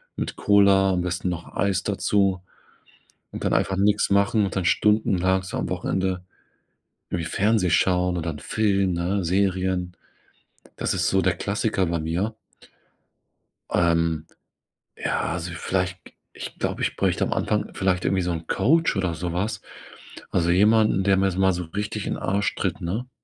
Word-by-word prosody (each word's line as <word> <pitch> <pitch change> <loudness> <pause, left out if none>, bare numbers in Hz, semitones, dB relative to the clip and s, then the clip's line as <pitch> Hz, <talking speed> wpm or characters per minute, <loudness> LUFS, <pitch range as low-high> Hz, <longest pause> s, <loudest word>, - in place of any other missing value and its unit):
mit - - -4
Cola, 100 -1 +4
am 90 - 0
besten 90 +1 -2
noch 85 -1 -6
Eis 95 -2 0
dazu. 100 -2 +1 0.9
Und - - -6
dann - - +2
einfach 95 - +1
nix 105 +1 +2
machen 100 +2 +3
und 95 - -3
dann 95 - 0
stundenlang 95 -3 +2
so 95 - -6
am - - -2
Wochenende, 95 0 -1 0.9
irgendwie 85 -2 -2
Fernsehen 105 -3 +2
schauen 90 0 +2
oder 80 0 -2
'n 75 - -9
Film, 100 -4 +1
ne, 90 +3 -1
Serien. 90 -1 0 0.8
Das - - -1
ist - - +1
so 95 0 +2
der 90 -1 +1
Klassiker 100 -2 -1
bei 85 -1 -1
mir. 85 +8 -2 1.4
Ähm, 85 -2 +1 0.7
ja, - - -2
also, 85 +1 -4
vielleicht, 90 +2 -2
k - - -14 0.2
ich - - -8
glaube, - - -3
ich - - -1
bräuchte - - +1
am - - -1
Anfang, - - -1
vielleicht 90 -2 0
irgendwie 95 -1 +2
so 90 0 -1
'n 80 -1 -5
Coach 165 +3 +2
oder 95 -3 0
sowas. 90 +6 -3 0.7
Also, 85 -1 +2
jemanden, 105 +1 +4
der 95 0 +3
mir 95 - +3
s 95 - -2
mal 95 0 +4
so 90 0 -3
richtig 100 +6 -4
in - - -1
den - - -6
Arsch 100 +1 0
tritt, 100 +1 -2
ne? 110 +9 -3
95 Hz, 165 wpm, -24 LUFS, 90-100 Hz, 1.4 s, Cola